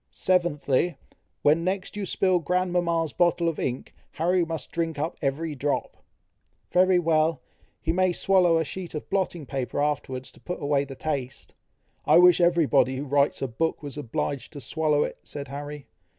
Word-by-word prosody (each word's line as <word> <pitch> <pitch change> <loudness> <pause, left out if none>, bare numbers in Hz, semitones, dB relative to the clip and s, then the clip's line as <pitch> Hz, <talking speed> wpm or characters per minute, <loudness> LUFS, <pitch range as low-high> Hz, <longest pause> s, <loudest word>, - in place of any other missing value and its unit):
"Seventhly, 175 -3 +1 0.5
when 155 +3 +4
next 190 +3 -2
you 205 -2 -3
spill 185 -1 +2
grandmama's 175 -1 0
bottle 175 -1 +2
of 165 - -1
ink, 125 0 -3 0.2
Harry 175 +3 +2
must 160 -5 -5
drink 165 -2 -2
up 155 +3 -2
every 150 +3 -1
drop." 145 +1 -2 0.8
"Very 185 +1 +4
well! 165 -1 +1 0.4
he 160 - -1
may 185 +1 +2
swallow 180 -2 +3
a 160 - 0
sheet 180 +2 -6
of 150 - -5
blotting 185 -5 -1
paper 135 -1 -3
afterwards, 130 -3 -2
to - - -18
put 180 - -5
away 145 -1 +1
the 135 -1 -9
taste." 135 -3 -4 0.5
"I - - +5
wish 180 0 +7
every 170 -1 +4
body 130 -2 +3
who 140 +3 -4
writes 140 0 +1
a - - 0
book, 160 +7 -2
was 145 -2 -6
obliged 145 0 -3
to 145 - -7
swallow 150 -1 +1
it," - - -5
said 140 -1 -7
Harry. 145 +1 -7
160 Hz, 170 wpm, -26 LUFS, 145-175 Hz, 0.8 s, wish